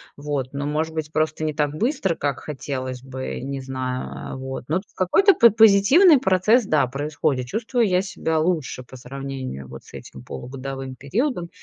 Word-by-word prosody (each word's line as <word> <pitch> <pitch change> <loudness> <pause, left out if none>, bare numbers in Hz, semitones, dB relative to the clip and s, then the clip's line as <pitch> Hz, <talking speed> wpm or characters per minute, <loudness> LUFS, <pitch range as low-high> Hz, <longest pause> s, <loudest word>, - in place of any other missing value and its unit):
Вот, 140 -3 -3
но, 140 +1 -3
может 155 +2 -1
быть, 155 -1 -4
просто 155 0 0
не 155 -1 -1
так 145 -1 0
быстро, 195 - 0
как 140 -4 -2
хотелось 130 -3 -5
бы, 130 0 -6
не 135 +1 -4
знаю, 130 -1 -5
э, - - -7
вот, 130 0 -6
но 160 +5 +1
в 195 - -18
какой-то 385 - +4
по 235 - +7
позитивный 225 - +6
процесс, 215 +2 +3
да, 155 -8 +2
происходит. 140 -1 -2
Чувствую 230 - 0
я 180 0 +3
себя 160 -4 -2
лучше 155 -6 -1
по 125 - -14
сравнению 130 - -6
вот 65 +1 -10
с - - -18
этим 65 - -10
полугодовым 135 - -7
периодом. 175 - -2
145 Hz, 175 wpm, -23 LUFS, 130-185 Hz, -, по